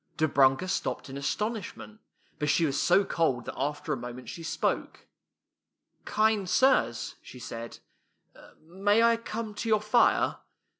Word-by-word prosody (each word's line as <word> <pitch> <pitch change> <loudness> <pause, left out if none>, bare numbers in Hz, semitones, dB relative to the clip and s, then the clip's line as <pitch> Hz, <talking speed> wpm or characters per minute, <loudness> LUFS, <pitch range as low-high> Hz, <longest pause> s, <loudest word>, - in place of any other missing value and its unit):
Dobrunka 140 +1 +3
stopped 135 -6 -3
in - - -7
astonishment, 210 +7 -4 0.4
but 150 -1 0
she 165 +3 +3
was 140 -2 0
so 190 +3 +4
cold 135 -10 0
that - - -5
after 145 +2 -2
a - - -2
moment 125 +1 -8
she 170 - -7
spoke. 160 - -2 0.5
" - - -48
Kind 215 -3 +2
sirs,'' 260 - +2
she - - -12
said, 115 -1 -7 0.5
" - - -19
may 200 +7 +2
I 230 0 +5
come 230 -1 -5
to 215 +2 -4
your 215 -1 +4
fii'e? 215 +3 +3
170 Hz, 150 wpm, -28 LUFS, 135-215 Hz, 0.5 s, I